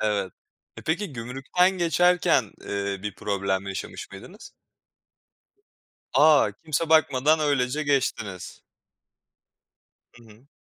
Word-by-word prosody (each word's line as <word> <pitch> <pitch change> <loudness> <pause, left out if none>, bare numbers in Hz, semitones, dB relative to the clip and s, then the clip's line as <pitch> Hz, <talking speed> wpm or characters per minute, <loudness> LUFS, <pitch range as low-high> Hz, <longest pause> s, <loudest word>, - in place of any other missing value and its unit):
Evet. 100 -3 -1 0.4
E, - - -9
peki, 170 +2 -2
gümrükten 135 +9 0
geçerken, 175 +1 +2
eee, 100 -1 -3
bir 105 -2 -5
problem 100 -1 -2
yaşamış 95 - -7
mıydınız? 180 - -12 1.6
A, 150 -8 +5
kimse 160 +1 -1
bakmadan 155 -1 +3
öylece 145 -1 0
geçtiniz. 115 -9 -2 1.5
Hı 120 - -17
hı. 115 +4 -19
130 Hz, 95 wpm, -25 LUFS, 100-155 Hz, 1.6 s, A